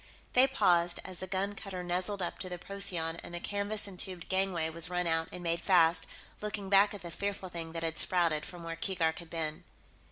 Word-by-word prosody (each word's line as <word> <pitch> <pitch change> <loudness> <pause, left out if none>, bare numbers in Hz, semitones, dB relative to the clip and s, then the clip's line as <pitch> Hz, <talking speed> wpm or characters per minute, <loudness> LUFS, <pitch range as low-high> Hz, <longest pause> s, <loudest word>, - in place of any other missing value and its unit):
They 255 +2 +7
paused, 175 -9 +3
as 185 - -7
the 185 - -4
gun 195 +2 -1
cutter 195 -3 -6
nuzzled 185 +2 -1
up 175 - -3
to 185 - -2
the 180 - -4
Procyon 175 -4 -1
and 175 - -7
the - - -1
canvas 205 +3 -1
entubed 185 -2 -3
gangway 190 -4 +1
was 165 +1 0
run 180 0 0
out 165 -1 +1
and 180 - -6
made 170 0 0
fast, 170 -3 +4 0.3
looking 205 -2 -3
back 200 +1 +5
at 195 - -9
the 170 - -6
fearful 200 0 -3
thing 165 -2 -6
that 165 0 -4
had 165 -1 -1
sprouted 165 -4 +3
from 175 +1 -8
where 165 0 -4
Keegark 165 -2 0
had 170 -2 -9
been. 155 -2 -3
180 Hz, 215 wpm, -32 LUFS, 165-195 Hz, 0.3 s, They